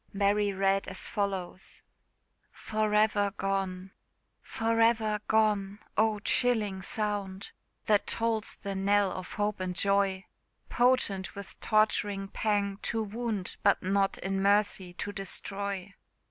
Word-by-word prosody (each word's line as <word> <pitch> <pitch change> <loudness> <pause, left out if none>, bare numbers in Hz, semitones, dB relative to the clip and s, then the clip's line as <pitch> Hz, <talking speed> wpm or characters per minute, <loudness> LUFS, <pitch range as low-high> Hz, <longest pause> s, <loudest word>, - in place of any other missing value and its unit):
Mary 205 +1 +2
read 195 0 +1
as - - -4
follows: 195 -3 -4 0.7
FOR 215 -1 -1
EVER 210 -1 +3
GONE. 190 -1 -2 0.5
For 225 0 -1
ever 220 -2 +3
gone! 210 -2 +2 0.2
oh, 215 0 +3
chilling 210 -5 +1
sound! 200 -1 -3 0.3
That 210 -2 +2
tolls 225 -1 -1
the 200 - -3
knell 200 0 +2
of 185 -1 -6
hope 210 -1 -1
and 185 -1 -3
joy! 195 -1 +1 0.4
Potent 240 -6 +1
with 200 -1 -9
torturing 205 -2 +1
pang 205 -2 0
to 225 -1 -1
wound, 215 -2 -3
But 200 - +3
not 195 +1 +1
in 195 0 -2
mercy 200 -2 +2
to 205 - -4
destroy. 195 -1 -4
200 Hz, 120 wpm, -29 LUFS, 195-215 Hz, 0.7 s, EVER